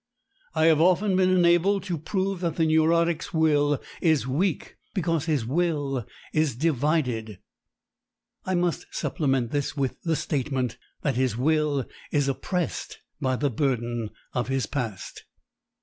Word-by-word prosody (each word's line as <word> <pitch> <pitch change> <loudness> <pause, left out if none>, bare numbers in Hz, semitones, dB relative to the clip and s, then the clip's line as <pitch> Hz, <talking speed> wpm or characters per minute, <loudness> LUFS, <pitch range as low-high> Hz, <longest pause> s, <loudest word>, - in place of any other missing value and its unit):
I 160 0 +3
have 160 -1 +5
often 185 +3 +3
been 185 0 +4
enabled 180 +2 +4
to 180 -3 -2
prove 190 +4 -1
that 170 -3 -1
the 165 - +2
neurotic's 165 +1 +2
will 145 -3 +3 0.2
is 160 -6 +3
weak 155 +7 -1 0.2
because 165 -4 0
his 150 -8 0
will 145 - -1 0.3
is 155 -5 +1
divided. 130 - 0 1.1
I 185 - -1
must 175 -1 0
supplement 135 -6 -1
this 145 0 -2
with 135 -2 -2
the 165 -2 0
statement 135 -4 -2 0.2
that 135 -4 0
his 130 -4 +1
will 150 -1 +1 0.3
is 145 -2 +2
oppressed 170 +6 -2 0.2
by 130 -2 +1
the 140 +1 0
burden 120 -3 -1 0.2
of 125 -1 -1
his 135 -1 0
past. 120 -9 -5
150 Hz, 135 wpm, -26 LUFS, 130-170 Hz, 1.1 s, have